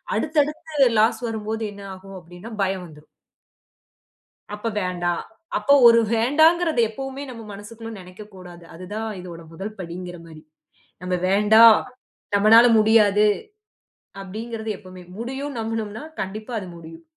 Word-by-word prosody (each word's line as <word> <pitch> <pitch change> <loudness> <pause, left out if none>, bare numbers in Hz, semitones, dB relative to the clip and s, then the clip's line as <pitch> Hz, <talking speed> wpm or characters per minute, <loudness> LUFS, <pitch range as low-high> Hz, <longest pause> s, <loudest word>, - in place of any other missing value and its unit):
அடுத்து, 310 +1 -2
அடுத்து 300 -2 0
லாஸ் 220 +3 +2
வரும்போது, 220 0 -4
என்ன 200 0 -11
ஆகும்? 195 +1 -12
அப்பிடீன்னா! 175 +6 -12
பயம் 190 -1 -2
வந்துரும். 150 -1 -16 1.5
"அப்ப 210 +2 -4
வேண்டாம்" 175 -1 -2 0.4
அப்போ 280 - +4
1 230 0 +8 0.2
வேண்டாங்கிறத 315 +6 +3
எப்பவுமே 270 +4 -7
நம்ம 230 -2 -9
மனசுக்குள்ள 225 +3 -10
நெனைக்க 185 +3 -12
கூடாது. 175 -2 -12
அது 175 +2 -10
தான் 220 +1 -3
இதோட 170 -2 -10
முதல் 200 +6 -7
படிங்கிற 175 0 -7
மாரி. 155 -2 -13 0.6
"நம்ம 180 0 -2
வேண்டாம், 215 +3 +7 0.6
நம்மனால 220 +4 +7
முடியாது" 215 -1 +4 1.0
அப்பிடீங்கிறது 220 +3 -6
எப்போமே 185 -2 -12
"முடியும்ன்னு" 265 +3 -5
நம்பினோம்னா, 220 +1 -4 0.2
கண்டிப்பா 215 +5 -6
அது 190 - -8
முடியும். 165 - -12
215 Hz, 125 wpm, -22 LUFS, 185-230 Hz, 1.5 s, 1